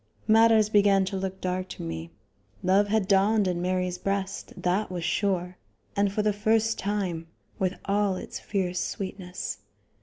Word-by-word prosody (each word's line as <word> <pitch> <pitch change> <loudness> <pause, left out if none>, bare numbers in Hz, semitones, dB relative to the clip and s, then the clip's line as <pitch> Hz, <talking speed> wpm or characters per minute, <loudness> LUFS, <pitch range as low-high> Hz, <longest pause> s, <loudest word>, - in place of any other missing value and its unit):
Matters 220 -1 +6
began 200 -2 +4
to 195 - -4
look 190 0 -3
dark 185 0 -2
to - - -7
me. 80 0 -5 0.5
Love 195 +3 +4
had 210 -2 +1
dawned 200 +1 +4
in 175 -1 -1
Mary's 180 0 -1
breast, 195 0 -2
that 185 +4 0
was 175 -2 -4
sure, 180 0 -1 0.4
and 200 -1 +2
for 210 +1 0
the 210 0 +2
first 220 +2 +1
time, 190 -5 -2 0.3
with 185 0 0
all 200 -1 +1
its - - -6
fierce 180 -3 -2
sweetness. 185 -2 -4
195 Hz, 155 wpm, -27 LUFS, 180-205 Hz, 0.5 s, Matters